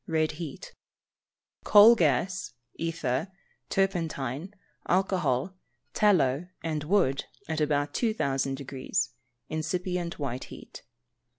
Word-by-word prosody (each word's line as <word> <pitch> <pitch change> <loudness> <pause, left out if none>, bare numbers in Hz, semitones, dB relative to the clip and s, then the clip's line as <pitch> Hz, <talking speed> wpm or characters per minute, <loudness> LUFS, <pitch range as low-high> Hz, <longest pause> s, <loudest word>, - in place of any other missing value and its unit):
(red 160 -1 +1
heat); 155 -3 -8 0.9
coal 210 +3 +9
gas, 185 - +1 0.2
ether, 160 -2 -2 0.4
turpentine, 165 -5 -1 0.4
alcohol, 185 -5 +1 0.4
tallow, 175 -7 +3 0.2
and 155 -2 -2
wood, 150 -7 +2 0.2
at 160 -1 -2
about 145 -1 +1
2,000 135 - 0
deg. 135 -1 -8 0.5
(incipient 175 +2 -2
white 130 -3 -4
heat). - - -11
160 Hz, 90 wpm, -28 LUFS, 140-185 Hz, 0.9 s, coal